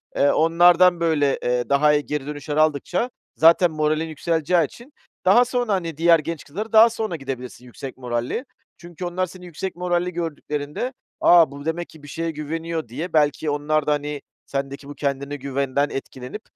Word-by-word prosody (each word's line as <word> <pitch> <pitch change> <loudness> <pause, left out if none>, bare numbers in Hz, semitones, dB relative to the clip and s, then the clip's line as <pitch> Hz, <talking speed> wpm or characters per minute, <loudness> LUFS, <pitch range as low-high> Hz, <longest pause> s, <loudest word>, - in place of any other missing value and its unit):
Eee, 140 - +4
onlardan 175 +2 +5
böyle, 155 -4 +1
eee, 125 -1 0
daha 150 +2 +4
iyi 150 0 +1
geri 150 -2 -3
dönüşler 150 0 -4
aldıkça, 155 - +1 0.3
zaten 165 +2 +5
moralin 155 +1 0
yükseleceği 165 +2 +1
için, 240 - -14 0.3
daha 235 +7 +6
sonra, 245 -3 -1
hani, 165 -5 -2
diğer 165 0 +5
genç 165 0 -5
kızlara 210 +10 -6
daha 220 +1 +8
sonra 220 -5 -3
gidebilirsin 130 -4 -7
yüksek 125 +3 -9
moralle. 125 - -3 0.3
Çünkü 175 +1 -8
onlar 180 +1 -1
seni 185 0 -12
yüksek 180 +2 -5
moralli 180 0 -1
gördüklerinde, 155 - -4 0.3
“A, 170 -4 +6
bu 140 +1 -9
demek 170 +2 -3
ki 155 -2 -16
bir - - -11
şeye 165 +3 -3
güveniyor.“ 160 0 -4
diye, 155 +9 -6
belki 150 0 +2
onlar 150 +1 0
da - - +3
hani 145 0 -3 0.2
sendeki 140 0 -5
bu 145 - -8
kendine 140 0 -2
güvenden 140 +1 -1
etkilenip, 135 +6 -7
155 Hz, 170 wpm, -22 LUFS, 145-175 Hz, 0.3 s, daha